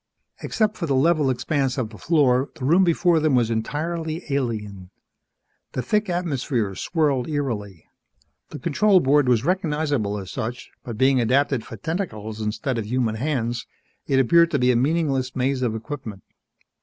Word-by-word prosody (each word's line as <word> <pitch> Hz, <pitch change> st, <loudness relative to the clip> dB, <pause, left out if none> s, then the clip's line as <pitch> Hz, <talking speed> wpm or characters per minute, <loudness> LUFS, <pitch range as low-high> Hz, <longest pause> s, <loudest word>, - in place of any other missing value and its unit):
Except 215 Hz, -1 st, 0 dB
for 170 Hz, -, -3 dB
the 140 Hz, -, +1 dB
level 150 Hz, 0 st, +3 dB
expanse 135 Hz, +1 st, -1 dB
of 115 Hz, -4 st, -2 dB
the 105 Hz, -, -11 dB
floor, 140 Hz, -5 st, +2 dB
the 130 Hz, -, -5 dB
room 170 Hz, +7 st, +5 dB
before 170 Hz, -1 st, +3 dB
them 155 Hz, -3 st, +2 dB
was 120 Hz, -2 st, +2 dB
entirely 160 Hz, +8 st, -3 dB
alien. 105 Hz, -8 st, -3 dB, 0.8 s
The 130 Hz, -, -2 dB
thick 210 Hz, -, 0 dB
atmosphere 135 Hz, -, -1 dB
swirled 140 Hz, -, 0 dB
eerily. 110 Hz, -, -3 dB, 0.6 s
The -, -, -7 dB
control 200 Hz, +4 st, +3 dB
board 140 Hz, -2 st, +3 dB
was 120 Hz, 0 st, +2 dB
recognizable 150 Hz, -, 0 dB
as 95 Hz, -2 st, -7 dB
such, 120 Hz, +3 st, -5 dB
but 115 Hz, -3 st, -6 dB
being 130 Hz, +1 st, +3 dB
adapted 130 Hz, +1 st, +1 dB
for 115 Hz, -, -9 dB
tentacles 110 Hz, -, -4 dB
instead 115 Hz, +4 st, -2 dB
of 105 Hz, -, -4 dB
human 120 Hz, -1 st, 0 dB
hands, 120 Hz, -1 st, -2 dB, 0.4 s
it 135 Hz, -1 st, +3 dB
appeared 170 Hz, +6 st, +5 dB
to 145 Hz, -, 0 dB
be 125 Hz, -1 st, +3 dB
a -, -, +1 dB
meaningless 135 Hz, -1 st, 0 dB
maze 130 Hz, +1 st, 0 dB
of 120 Hz, -3 st, 0 dB
equipment. 110 Hz, -4 st, -7 dB
135 Hz, 160 wpm, -23 LUFS, 115-155 Hz, 0.8 s, room